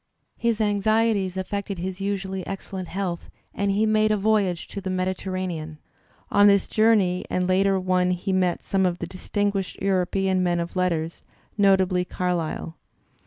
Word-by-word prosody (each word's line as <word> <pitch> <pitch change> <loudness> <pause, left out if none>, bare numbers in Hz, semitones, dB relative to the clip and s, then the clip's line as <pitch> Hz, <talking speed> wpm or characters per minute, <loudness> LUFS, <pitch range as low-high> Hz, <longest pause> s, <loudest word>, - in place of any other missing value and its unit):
His 235 -2 +1
anxieties 210 -2 +1
affected 200 +1 -3
his 185 +2 -5
usually 190 -1 -2
excellent 190 -1 -5
health, 180 -1 -4 0.2
and 200 0 -1
he 205 +2 +2
made 215 0 +3
a 215 - +2
voyage 200 -4 +1
to 200 - -6
the 190 - -4
Mediterranean. 185 -4 -3 0.5
On 205 0 +6
this 200 -1 +4
journey 210 -5 +2
and 180 - 0
a - - 0
later 190 +1 +3
one 185 -1 +1
he 180 +2 -1
met 185 -2 +1
some 190 -1 +1
of 175 -1 -2
the - - -4
distinguished 200 0 -2
European 190 0 +1
men 175 -1 +1
of 170 +2 -4
letters, 170 -3 -1 0.3
notably 190 -3 +3
Carlyle. 175 -3 -3
190 Hz, 155 wpm, -24 LUFS, 180-200 Hz, 0.5 s, On